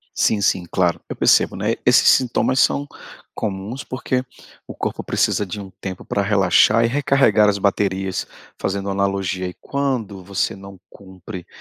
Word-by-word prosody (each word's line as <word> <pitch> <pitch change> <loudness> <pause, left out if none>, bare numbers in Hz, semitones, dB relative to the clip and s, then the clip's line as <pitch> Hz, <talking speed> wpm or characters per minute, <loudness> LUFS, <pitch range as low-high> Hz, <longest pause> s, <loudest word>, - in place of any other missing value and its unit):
Sim, 105 - +2
sim, 95 -2 +1
claro, 90 -2 +1
eu - - -5
percebo, - - +3
né, - - 0
esses - - +6
sintomas 130 +1 +3
são 145 +2 +2 0.5
comuns, 105 +5 -4
porque 130 0 -2 0.4
o - - -9
corpo - - -4
precisa 105 - 0
de 100 +3 -6
um 95 -1 -9
tempo 95 -2 -6
para 100 - -1
relaxar 105 +3 +4
e - - +3
recarregar 135 -6 +3
as 100 - +2
baterias 95 -1 -1 0.3
fazendo 100 0 -2
analogia, 95 -1 -1
e 90 - -6
quando 120 -9 -3
você 95 -1 -2
não 100 0 -11
cumpre 95 -1 -11
100 Hz, 155 wpm, -20 LUFS, 95-115 Hz, 0.5 s, esses